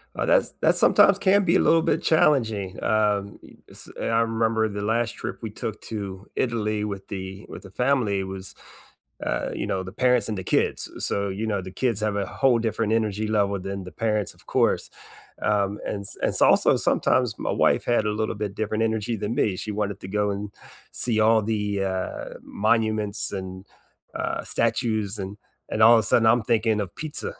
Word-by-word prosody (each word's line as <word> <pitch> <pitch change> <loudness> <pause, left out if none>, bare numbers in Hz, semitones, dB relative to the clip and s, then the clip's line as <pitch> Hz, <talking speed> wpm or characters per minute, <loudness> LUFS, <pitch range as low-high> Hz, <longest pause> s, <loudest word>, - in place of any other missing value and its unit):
Uh, - - -1
that's - - +3
that - - +3
sometimes 200 0 +5
can 200 +1 +4
be 185 0 +3
a - - +5
little 165 - +4
bit - - 0
challenging, 115 - +2
um, 105 -2 +1
y - - -16
s - - -10
I 115 0 +1
remember 115 -1 +1
the 100 -1 -5
last 115 +2 0
trip 120 - -6
we 110 - -4
took 105 +1 -5
to 100 -2 -5
Italy 110 -3 -1
with 100 -2 -6
the 95 +1 -7
with - - -9
the 95 - -12
family 120 -4 +1
was, 95 0 -7 0.7
uh, - - -1
you - - -3
know, 95 -1 -1
the 95 0 -9
parents 125 -4 +4
and 105 - -2
the 95 - -5
kids, - - 0
so, 100 0 -1
you 100 +4 -3
know, 100 -3 -1
the 95 - -8
kids 115 -5 +1
have 105 -1 -1
a 100 -1 -1
whole 130 +3 +2
different 110 -1 -1
energy 110 -1 0
level 100 -2 +1
than 95 0 -5
the 90 - -10
parents, 105 -3 0
of - - -20
course, - - +1 0.5
um, 105 -1 +1
and 100 - -3
s 100 - -4
and - - +3
s - - -6
it's - - +2
also - - +5
sometimes 125 -4 +1
my - - -2
wife - - +3
had 120 -2 +2
a 105 - 0
little 110 - -1
bit 105 -1 -4
different 110 +1 -2
energy 110 +1 -1
than 105 +2 -3
me. 100 -5 +1
She 105 - -4
wanted 100 -1 -2
to 95 - -8
go 105 +1 0
and 100 +1 -4 0.4
see 115 -3 0
all 110 +1 +5
the, 110 0 -1 0.3
uh, 95 0 -4 0.2
monuments 110 -1 0
and, 95 0 -6 0.5
uh, - - -2
statues, 110 -3 0
and 100 +1 -6 0.3
and 110 - 0
all 115 +2 +9
of - - +4
a - - -2
sudden 115 +3 +3
I'm 120 +1 +4
thinking 110 -1 +1
of 90 -4 -8
pizza. 155 -1 -4
105 Hz, 205 wpm, -24 LUFS, 100-115 Hz, 0.7 s, all